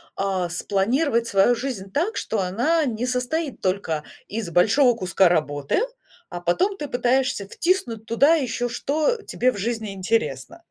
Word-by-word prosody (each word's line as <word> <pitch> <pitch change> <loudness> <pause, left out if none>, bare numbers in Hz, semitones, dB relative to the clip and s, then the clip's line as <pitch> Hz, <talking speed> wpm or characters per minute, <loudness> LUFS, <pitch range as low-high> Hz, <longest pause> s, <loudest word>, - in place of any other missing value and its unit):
а, 190 -3 -1
спланировать 230 - 0
свою 195 +4 +4
жизнь 225 -7 -5
так, 350 - -1
что 220 - -2
она 245 - +1
не 240 -1 -2
состоит 255 +4 -2
только 185 -5 -1 0.2
из 215 -4 -4
большого 230 - +4
куска 185 -3 +3
работы, 145 - 0 0.5
а 175 - -6
потом 365 - +1
ты 295 - -5
пытаешься 250 -4 0
втиснуть 245 - -1
туда 280 +8 +4
еще 245 -5 -1
что 305 - -1
тебе 255 -9 0
в 205 - -8
жизни 220 0 -3
интересно. 225 - -2
230 Hz, 145 wpm, -23 LUFS, 195-275 Hz, 0.5 s, свою